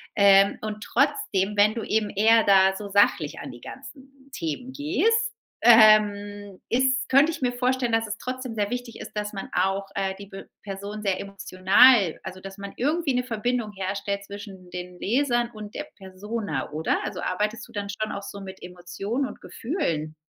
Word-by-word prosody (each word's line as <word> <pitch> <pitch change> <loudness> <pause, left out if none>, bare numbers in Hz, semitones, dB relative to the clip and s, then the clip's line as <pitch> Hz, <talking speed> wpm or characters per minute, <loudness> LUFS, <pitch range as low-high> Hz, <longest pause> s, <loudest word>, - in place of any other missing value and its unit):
Ähm, 200 -1 +5
und 215 0 -5
trotzdem, 205 - 0
wenn 210 +1 +5
du 230 - -3
eben 215 -1 0
eher 220 +2 +4
da 190 -1 +5
so 205 0 -6
sachlich 195 -6 +2
an - - -7
die 120 0 -13
ganzen 270 0 -12
Themen 245 - -4
gehst, 325 +10 +1 0.5
ähm, 205 -3 +5
ist 260 +2 +1
könnte 280 +5 +5
ich - - -8
mir 250 -1 +1
vorstellen, 250 0 0
dass 225 0 +1
es 215 +1 -4
trotzdem 255 -2 -5
sehr 205 -1 -1
wichtig 245 -1 -5
ist, - - -8
dass 210 0 -3
man 195 - -6
auch, 195 +2 0
äh, 195 -1 -1
die 200 - -10
B 195 0 -9 0.2
Person 200 +1 -6
sehr 195 -2 0
emotional 195 +1 +4
also, 185 - -7
dass 195 +1 -10
man 200 0 -7
irgendwie 295 +2 0
'ne 250 0 0
Verbindung 230 -2 -2
herstellt 200 +1 -3
zwischen 200 -3 -10
den 180 0 -7
Lesern 240 0 +1
und 210 -2 -10
der 300 - -4
Persona, 190 - -5
oder? 155 +1 0
Also, - - -5
arbeitest 210 +4 -2
du - - -19
dann 205 -1 -4
schon 215 +1 -3
auch 200 - -6
so 200 - -8
mit 190 -1 -10
Emotionen 180 +8 -4
und - - -11
Gefühlen? 165 - -3
205 Hz, 180 wpm, -25 LUFS, 195-240 Hz, 0.5 s, Ähm